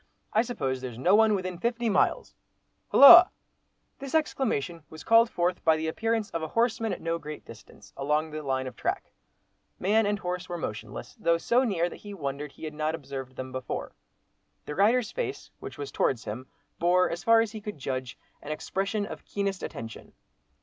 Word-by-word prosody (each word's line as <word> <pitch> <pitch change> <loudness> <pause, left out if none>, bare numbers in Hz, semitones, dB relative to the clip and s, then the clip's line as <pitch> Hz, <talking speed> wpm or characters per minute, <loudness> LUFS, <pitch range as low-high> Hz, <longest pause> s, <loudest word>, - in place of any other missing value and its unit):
I 220 - +4
suppose 135 - -3
there's 125 -3 -6
no 175 +10 +2
one 215 0 +5
within 185 -2 -4
fifty 235 +2 -1
miles—Hulloa!" 280 - +5 0.7
This 275 +2 -5
exclamation 220 - -1
was 160 0 -11
called 230 +1 +5
forth 180 -2 -1
by 160 -1 +4
the 160 0 -3
appearance 225 +5 -1
of 165 - -3
a 160 - -3
horseman 225 +2 0
at - - -5
no 165 0 -2
great 150 -1 -8
distance—along 135 +8 -4
the 155 0 -5
line 130 -2 -1
of 130 -3 -7
track. - - -3 0.7
Man 210 +3 +2
and 205 0 0
horse 180 -1 -4
were 175 - -3
motionless, 110 -6 -6
though 170 -5 +2
so 240 +9 +2
near 185 -8 0
that - - -9
he 205 -1 -9
wondered 140 -3 -5
he - - -15
had 155 -1 -5
not 155 +1 -1
observed 135 -3 -8
them 130 0 -6
before. 130 -1 -5 0.7
The 150 - -5
rider's 220 +6 +2
face, 450 -5 -5
which - - -9
was 425 - -6
towards 120 -4 0
him, 125 +5 -6 0.3
bore, 180 +2 +3
as 170 - -5
far 230 0 +6
as 225 -2 -2
he 215 -1 -8
could 210 -4 -7
judge, 130 -3 -4 0.2
an 150 - -7
expression 195 +6 -2
of - - -9
keenest 200 -1 -3
attention. 115 -1 -8
175 Hz, 185 wpm, -27 LUFS, 140-220 Hz, 0.7 s, far